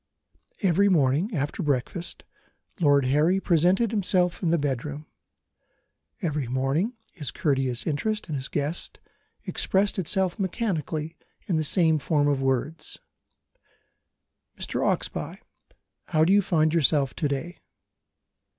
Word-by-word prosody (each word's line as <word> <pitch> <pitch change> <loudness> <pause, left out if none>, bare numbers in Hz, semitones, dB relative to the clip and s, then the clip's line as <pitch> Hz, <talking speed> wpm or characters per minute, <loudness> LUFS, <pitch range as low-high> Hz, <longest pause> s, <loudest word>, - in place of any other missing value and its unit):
Every 195 +2 +4
morning, 160 - +2
after 145 +5 -2
breakfast, 150 +4 -3 0.6
Lord 145 -5 +4
Harry 150 +8 +3
presented 185 +5 +2
himself 180 -4 +1
in 175 - +1
the 170 - +3
bedroom. 145 +1 -3 1.2
Every 150 -6 -1
morning, 135 - 0 0.2
his 150 -8 -4
courteous 130 -6 -1
interest 210 +8 -2
in 155 - -5
his 135 -1 -3
guest 150 +4 -3 0.5
expressed 195 +1 +1
itself 190 +1 0
mechanically 165 - -2 0.3
in 175 - 0
the 155 - +1
same 160 0 +3
form 145 0 +1
of 140 -2 +1
words: 135 +4 -2 1.6
"Mr. - - -3
Oxbye, - - -2 0.7
how 155 -2 +3
do 185 - +4
you 205 - +6
find 155 -4 +1
yourself 145 -4 +2
to 150 - 0
day?" 145 +6 -4
155 Hz, 120 wpm, -26 LUFS, 145-180 Hz, 1.6 s, you